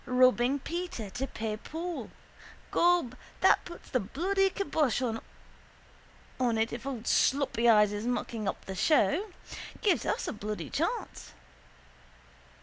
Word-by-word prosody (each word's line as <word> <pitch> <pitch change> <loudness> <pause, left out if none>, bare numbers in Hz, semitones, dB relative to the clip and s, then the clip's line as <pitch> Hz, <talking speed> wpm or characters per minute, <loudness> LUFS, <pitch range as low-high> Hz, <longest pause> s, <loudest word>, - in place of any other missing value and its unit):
Robbing 255 +1 +4
Peter 335 - -5
to 260 +5 -3
pay 215 -3 -4
Paul. 330 +8 -5 0.6
Gob, 345 -8 +3 0.3
that - - +5
puts 345 - -11
the 255 - +2
bloody 380 - +1
kybosh 315 - 0 1.4
on 240 -3 +2
it 225 +1 0
if 240 +3 -6
old 245 -4 -4
sloppy 260 -4 +3
eyes 210 -2 +5
is 210 +3 -3
mucking 230 -3 -2
up - - -3
the 190 - -5
show. 310 - +3 0.6
Give 405 -5 +3
us - - -1
a - - -2
bloody 205 - -5
chance. - - -3
250 Hz, 130 wpm, -30 LUFS, 220-330 Hz, 1.4 s, that